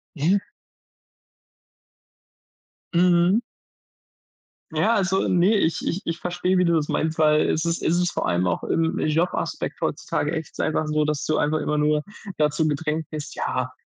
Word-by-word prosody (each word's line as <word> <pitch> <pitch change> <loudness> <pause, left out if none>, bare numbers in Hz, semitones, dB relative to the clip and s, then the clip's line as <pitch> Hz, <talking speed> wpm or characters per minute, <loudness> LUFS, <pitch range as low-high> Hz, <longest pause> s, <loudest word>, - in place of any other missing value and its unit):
Ja. 170 +7 +2 2.6
Mhm. 175 +3 +4 1.3
Ja, 230 +2 +2
also 190 -1 +1
ne, 185 +5 +3
ich 165 -4 +1
ich 185 +4 -2
ich 165 0 -3
verstehe, 180 +1 0
wie 180 - +3
du 170 - +3
das 155 -2 0
meinst, 160 0 -1
weil 155 -1 +4
es 160 - 0
ist 170 0 -1
es 170 - +2
ist 175 -1 +1
vor - - -2
allem 90 +1 +1
auch, - - -1
äh, - - -1
im 165 0 0
Jobaspekt 160 +4 -1
heutzutage 150 +2 -2
echt 160 -1 -5
einfach 155 0 0
so, 150 0 +1
dass 150 -2 -2
du 155 - 0
einfach 155 +1 +1
immer 150 0 -1
nur 150 0 +2 0.3
dazu 150 +1 +1
gedrängt 155 +1 -2
bist: 155 -2 -6
„Ja, 130 0 -2
160 Hz, 160 wpm, -23 LUFS, 150-175 Hz, 2.6 s, Mhm